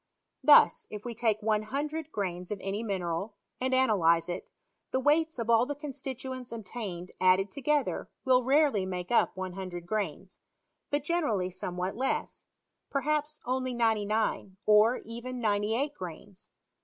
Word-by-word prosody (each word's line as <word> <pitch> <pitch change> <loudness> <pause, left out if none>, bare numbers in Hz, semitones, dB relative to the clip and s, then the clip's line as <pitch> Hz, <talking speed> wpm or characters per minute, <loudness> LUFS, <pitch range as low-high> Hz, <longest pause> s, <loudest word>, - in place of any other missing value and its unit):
Thus, - - +6
if 210 +1 -8
we 240 - -4
take 220 -2 0
100 280 +9 -1
grains 180 -3 -3
of 210 - -3
any 195 +3 -3
mineral, 195 -1 -3 0.2
and 260 +1 0
analyze 180 -10 +3
it, 175 - -5 0.4
the 260 - 0
we^hts 315 +3 +2
of 230 -2 -3
all 235 +1 +4
the 290 - -3
constituents 260 -3 -6
obtained 200 -5 -6
added 185 +2 +4
toge 290 +1 +1
ther - - -4 0.2
will 255 -1 +5
rarely 275 -5 +3
make 180 0 -4
up 235 - +3
100 185 -2 -5
grains, 190 -2 -3 0.5
but 290 -1 0
generally 235 - 0
somewhat 180 +1 -3
less; 265 +3 -2 0.4
perhaps 300 +2 -1
only 255 0 -1
99, 220 -3 0
or 215 +3 +5
even 240 +2 -6
98 220 +6 0
grains. 185 - -9
220 Hz, 140 wpm, -29 LUFS, 190-260 Hz, 0.5 s, Thus